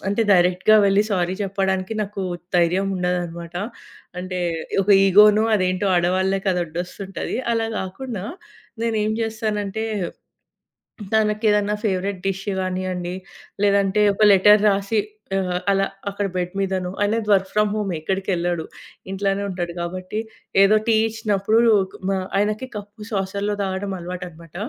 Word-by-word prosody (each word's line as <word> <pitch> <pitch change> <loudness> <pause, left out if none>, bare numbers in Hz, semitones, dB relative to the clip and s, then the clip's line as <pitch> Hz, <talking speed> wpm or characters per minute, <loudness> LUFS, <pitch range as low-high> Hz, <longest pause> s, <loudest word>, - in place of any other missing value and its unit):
అంటే, 205 +3 +1
డైరెక్ట్‌గా 180 +3 +4
వెళ్లి 195 +1 +4
సారీ 180 -2 0
చెప్పడానికి 190 0 -1
నాకు 200 -1 -5 0.3
ధైర్యముండదన్నమాట. 175 -1 0 0.7
అంటే 185 0 -4 0.4
ఒక 205 - -1 0.2
ఇగో‌నో, 210 +2 +6
అదేంటో 185 0 0
ఆడవాళ్ళకి 190 +3 +1
అదడోస్తుంటది. 180 +3 -4 0.2
అలా 225 -1 0
గాకుండా 200 +2 -5 0.6
నేనేం 220 -2 0
జేస్తానంటే, 220 -1 -2 1.3
తనకేదైనా 210 -1 +2
ఫేవరైట్ 195 -2 -1
డిష్ 195 0 -3
గానియండి, 185 -1 -3 0.5
లేదంటే 200 0 +3
ఒక 215 - +2
లెటర్ 210 +2 +6
రాసి 200 +2 0 0.4
ఆహ్, 180 -2 -1
అలా 195 0 +2 0.2
అక్కడ 200 +1 -3
బెడ్ 180 0 -2
మీదనో 190 -2 -1
ఆయనది 210 +1 0
వర్క్ 190 -1 +3
ఫ్రామ్ 210 -1 +2
హోమే 200 -4 -2
ఎక్కడికెళ్ళడు 175 -2 -1 0.5
ఇంట్లోనే 195 0 -1
ఉంటాడు. 175 -2 -3
కాబట్టి 185 +4 -4 0.4
ఏదో 195 +2 +6
టీ 225 - +4
ఇచ్చినప్పుడు 215 -1 +1 0.3
కు - - -12
మా 195 - +1 0.2
ఆయనకి 210 +5 0
కప్పు 205 +1 -10
సాసర్‌లో 200 +1 -1
తాగడం 195 0 -2
అలవాటన్నమాట. 175 -2 -8
195 Hz, 115 wpm, -22 LUFS, 185-210 Hz, 1.3 s, ఇగో‌నో